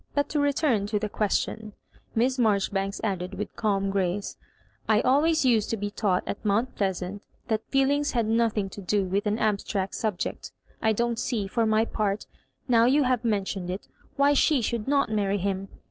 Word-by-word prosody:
But 285 Hz, 0 st, +1 dB
to 300 Hz, -, 0 dB
return 280 Hz, -7 st, +1 dB
to 210 Hz, 0 st, 0 dB
the 210 Hz, 0 st, -2 dB
question," 210 Hz, +1 st, -1 dB, 0.4 s
Miss 250 Hz, +3 st, +1 dB
Maijoribanks 200 Hz, -3 st, +1 dB
added, 190 Hz, -3 st, -2 dB
with 210 Hz, +2 st, -5 dB
calm 195 Hz, -3 st, 0 dB
grace; 195 Hz, 0 st, -1 dB, 0.5 s
''I 215 Hz, -1 st, +5 dB
always 305 Hz, +3 st, +3 dB
used 225 Hz, -5 st, +3 dB
to 225 Hz, -, -1 dB
be 205 Hz, 0 st, -3 dB
taught 200 Hz, -4 st, 0 dB
aft -, -, -5 dB
Mount 220 Hz, +4 st, +1 dB
Pleasant, 190 Hz, 0 st, -2 dB, 0.3 s
that 220 Hz, -1 st, -1 dB
feelings 280 Hz, +2 st, +2 dB
had 235 Hz, -3 st, +1 dB
nothing 225 Hz, -2 st, +1 dB
to 200 Hz, -, -8 dB
do 200 Hz, +1 st, +1 dB
witii 195 Hz, +3 st, -1 dB
an 210 Hz, +1 st, +1 dB
abstract 200 Hz, -3 st, -1 dB
sub 215 Hz, -5 st, -1 dB
ject -, -, -5 dB, 0.3 s
I 220 Hz, -, +3 dB
don't 235 Hz, +1 st, 0 dB
see, 220 Hz, -5 st, -1 dB
for 225 Hz, +3 st, 0 dB
my 220 Hz, +1 st, +3 dB
part, 210 Hz, -2 st, -2 dB, 0.4 s
now 230 Hz, -2 st, +5 dB
you 280 Hz, +4 st, +4 dB
have 250 Hz, -2 st, +1 dB
mentioned 195 Hz, -5 st, -1 dB
it, 185 Hz, +2 st, -5 dB, 0.3 s
why 280 Hz, +1 st, +4 dB
she 290 Hz, 0 st, +3 dB
should 230 Hz, -1 st, -2 dB
net 280 Hz, -2 st, +2 dB
nanry 205 Hz, -2 st, 0 dB
him. 195 Hz, 0 st, -2 dB
215 Hz, 185 wpm, -26 LUFS, 200-240 Hz, 0.5 s, I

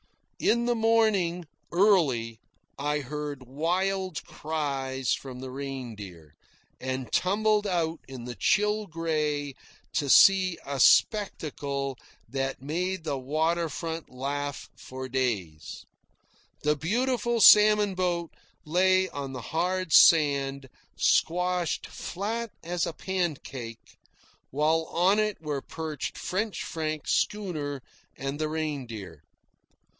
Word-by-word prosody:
In 235 Hz, +1 st, +2 dB
the 240 Hz, -, +2 dB
morning, 220 Hz, -7 st, +2 dB, 0.3 s
early, 150 Hz, -, +2 dB, 0.4 s
I 150 Hz, +1 st, 0 dB
heard 145 Hz, -1 st, -6 dB
wild 180 Hz, +6 st, -1 dB
cries 135 Hz, -4 st, -2 dB
from 130 Hz, -2 st, -6 dB
the 130 Hz, 0 st, -7 dB
Reindeer, 110 Hz, -, -7 dB, 0.5 s
and 130 Hz, -1 st, -4 dB
tumbled 210 Hz, +2 st, +2 dB
out 165 Hz, -3 st, -1 dB
in 130 Hz, -3 st, -8 dB
the 125 Hz, -, -5 dB
chill 210 Hz, -, +1 dB
grey 150 Hz, -4 st, -1 dB, 0.4 s
to 145 Hz, -3 st, 0 dB
see 185 Hz, +2 st, +6 dB
a 140 Hz, -1 st, -4 dB
spectacle 140 Hz, -, +2 dB, 0.3 s
that 135 Hz, +2 st, -3 dB
made 180 Hz, +5 st, -2 dB
the 145 Hz, -4 st, -2 dB
water 160 Hz, +5 st, 0 dB
front 165 Hz, +1 st, -5 dB
laugh 140 Hz, +2 st, -4 dB
for 130 Hz, 0 st, -8 dB
days. 105 Hz, -, -3 dB, 0.8 s
The 150 Hz, 0 st, +3 dB
beautiful 235 Hz, -, 0 dB
salmon 210 Hz, -1 st, +7 dB
boat 175 Hz, -2 st, -1 dB, 0.3 s
lay 185 Hz, +3 st, +3 dB
on 140 Hz, -2 st, -6 dB
the 130 Hz, -, -5 dB
hard 180 Hz, 0 st, 0 dB
sand, 140 Hz, -4 st, +5 dB, 0.3 s
squashed 180 Hz, 0 st, +1 dB
flat 225 Hz, +5 st, -4 dB
as 175 Hz, 0 st, -1 dB
a -, -, -4 dB
pancake, 145 Hz, -11 st, -4 dB, 0.5 s
while 155 Hz, +3 st, +1 dB
on 185 Hz, +6 st, +2 dB
it 215 Hz, -1 st, 0 dB
were 150 Hz, -3 st, -3 dB
perched 155 Hz, -2 st, -5 dB
French 205 Hz, +3 st, -2 dB
Frank's 155 Hz, -2 st, -3 dB
schooner 155 Hz, -10 st, -1 dB, 0.3 s
and 135 Hz, +2 st, -4 dB
the 155 Hz, 0 st, -1 dB
Reindeer. 125 Hz, -, -5 dB
155 Hz, 110 wpm, -27 LUFS, 135-185 Hz, 0.8 s, salmon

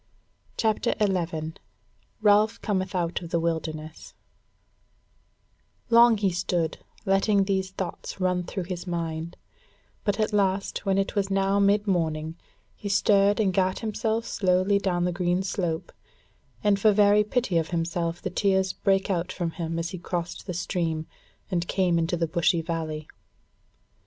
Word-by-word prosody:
CHAPTER 220 Hz, -2 st, +1 dB
11 170 Hz, -6 st, -1 dB, 0.7 s
Ralph 210 Hz, +2 st, +4 dB
Cometh 190 Hz, -3 st, -1 dB
Out 175 Hz, 0 st, -1 dB
of 170 Hz, -, -8 dB
the 170 Hz, -, +1 dB
Wilderness 160 Hz, -1 st, -4 dB, 1.8 s
Long 235 Hz, -1 st, +7 dB
he 200 Hz, -2 st, +1 dB
stood 175 Hz, -2 st, -1 dB, 0.3 s
letting 195 Hz, +1 st, +3 dB
these 190 Hz, -1 st, -1 dB
thoughts 190 Hz, 0 st, -6 dB
run 180 Hz, -1 st, +1 dB
through 185 Hz, +2 st, -4 dB
his 175 Hz, 0 st, -6 dB
mind, 165 Hz, -1 st, -3 dB, 0.7 s
but 205 Hz, 0 st, 0 dB
at 215 Hz, 0 st, 0 dB
last 195 Hz, 0 st, 0 dB
when 195 Hz, 0 st, +2 dB
it 195 Hz, 0 st, 0 dB
was 200 Hz, -2 st, 0 dB
now 195 Hz, +1 st, +2 dB
midmorning, 175 Hz, -6 st, +1 dB, 0.4 s
he 205 Hz, -, -6 dB
stirred 200 Hz, 0 st, +3 dB
and 195 Hz, -4 st, +2 dB
gat 185 Hz, 0 st, +1 dB
him 215 Hz, -1 st, -2 dB
slowly 200 Hz, -4 st, +1 dB
down 175 Hz, -3 st, 0 dB
the 180 Hz, -, +1 dB
green 175 Hz, +1 st, 0 dB
slope, 175 Hz, -4 st, -2 dB, 0.7 s
and 205 Hz, -1 st, +3 dB
for 215 Hz, +1 st, +5 dB
very 205 Hz, 0 st, +5 dB
pity 210 Hz, -5 st, 0 dB
of 160 Hz, -, -3 dB
himself 170 Hz, 0 st, -2 dB
the -, -, -2 dB
tears 190 Hz, -2 st, +1 dB
brake 195 Hz, 0 st, +1 dB
out 180 Hz, 0 st, -1 dB
from 175 Hz, -3 st, -3 dB
him 165 Hz, -1 st, -4 dB
as 165 Hz, +1 st, -2 dB
he 185 Hz, -, -6 dB
crossed 175 Hz, +1 st, -4 dB
the 180 Hz, -, -3 dB
stream 165 Hz, -3 st, -2 dB, 0.5 s
and 175 Hz, -1 st, 0 dB
came 180 Hz, -3 st, +2 dB
into 165 Hz, +2 st, 0 dB
the 165 Hz, -, +1 dB
bushy 165 Hz, +1 st, +1 dB
valley. 160 Hz, -2 st, -4 dB
185 Hz, 145 wpm, -26 LUFS, 170-200 Hz, 1.8 s, Long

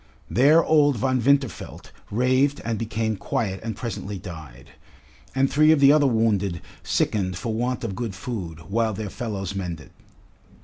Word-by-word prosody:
There 150 Hz, +7 st, +5 dB
old 145 Hz, -3 st, +4 dB
Von 130 Hz, +1 st, +1 dB
Winterfeld 135 Hz, -, 0 dB, 0.2 s
raved 130 Hz, +5 st, +2 dB
and 115 Hz, -2 st, -2 dB
became 110 Hz, -1 st, -2 dB
quiet 95 Hz, -1 st, -2 dB
and 110 Hz, -2 st, -4 dB
presently 105 Hz, -3 st, -5 dB
died, 80 Hz, -9 st, -10 dB, 0.6 s
and 135 Hz, +1 st, +3 dB
three 155 Hz, +3 st, +4 dB
of 160 Hz, -, +4 dB
the 140 Hz, +1 st, +7 dB
other 150 Hz, -2 st, +4 dB
wounded 105 Hz, -7 st, +1 dB, 0.2 s
sickened 95 Hz, -4 st, 0 dB
for 115 Hz, +2 st, -3 dB
want 125 Hz, +3 st, -2 dB
of 110 Hz, -4 st, -3 dB
good 110 Hz, -2 st, -4 dB
food, 95 Hz, -7 st, -6 dB
while 110 Hz, +5 st, -1 dB
their 105 Hz, -1 st, -5 dB
fellows 100 Hz, -6 st, -4 dB
mended. 85 Hz, -5 st, -6 dB
115 Hz, 150 wpm, -24 LUFS, 95-130 Hz, 0.6 s, the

